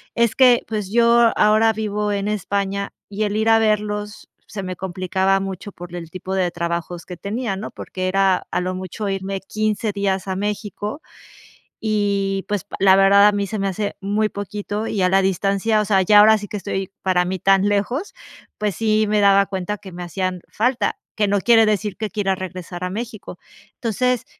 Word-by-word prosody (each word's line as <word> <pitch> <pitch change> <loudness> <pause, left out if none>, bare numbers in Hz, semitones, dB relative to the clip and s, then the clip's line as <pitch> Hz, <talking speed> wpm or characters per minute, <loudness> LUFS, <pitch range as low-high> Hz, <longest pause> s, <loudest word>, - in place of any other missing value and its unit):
es 235 -2 +2
que, 250 -2 +5
pues, 210 -3 -4
yo 235 0 +5
ahora 215 +1 +5
vivo 210 -1 -2
en 200 0 -1
España 200 0 -2 0.2
y 205 +1 -2
el 205 0 -1
ir 220 +1 0
a 225 - +6
verlos 210 -1 -1 0.2
se 200 -2 -6
me 185 0 -4
complicaba 190 +1 0
mucho 195 +1 -6
por 175 -1 -10
el 165 -2 -7
tipo 185 +1 -5
de 180 -2 +1
trabajos 170 0 -4
que 180 - -8
tenía, 215 +2 -3
¿no?, 200 +3 -6
porque 185 0 -5
era, 195 -1 +2
a - - 0
lo 185 +1 -2
mucho, 185 +3 -5
irme 195 0 -3
15 215 +2 -1
días 195 -1 -1
a 190 - -2
México 210 +5 -4 0.8
y, 200 -3 0
pues, 205 -3 -2
la 190 -1 +6
verdad 200 +1 +6
a - - +5
mí 200 0 0
se 215 +1 -4
me 195 - 0
hace 200 +2 -3
muy 210 +2 0
poquito, 205 +1 -4
y 205 - -1
a 180 - +3
la 195 +1 +4
distancia, 195 +3 +1
o - - -2
sea, 195 -2 +3
ya 205 +3 +6
ahora 220 +1 +6
sí 205 - -7
que 210 - -5
estoy, 195 -1 -4
para 185 -2 +2
mí 185 +1 -2
tan 195 +2 +3
lejos, 240 - -1 0.4
pues 210 -3 -1
sí 215 +1 +2
me 210 0 +2
daba 200 0 +5
cuenta 195 +1 -3
que 195 -2 -12
me 175 0 -8
hacían 180 +1 -3
falta, 235 -2 0 0.2
que 210 -1 +1
no 200 0 +2
quiere 225 +1 +5
decir 210 -1 -1
que 215 -1 -3
quiera 200 -3 0
regresar 180 -1 -7
a 180 - -1
México. 220 0 -7 0.4
Entonces, 250 +2 0
200 Hz, 195 wpm, -21 LUFS, 190-215 Hz, 0.8 s, a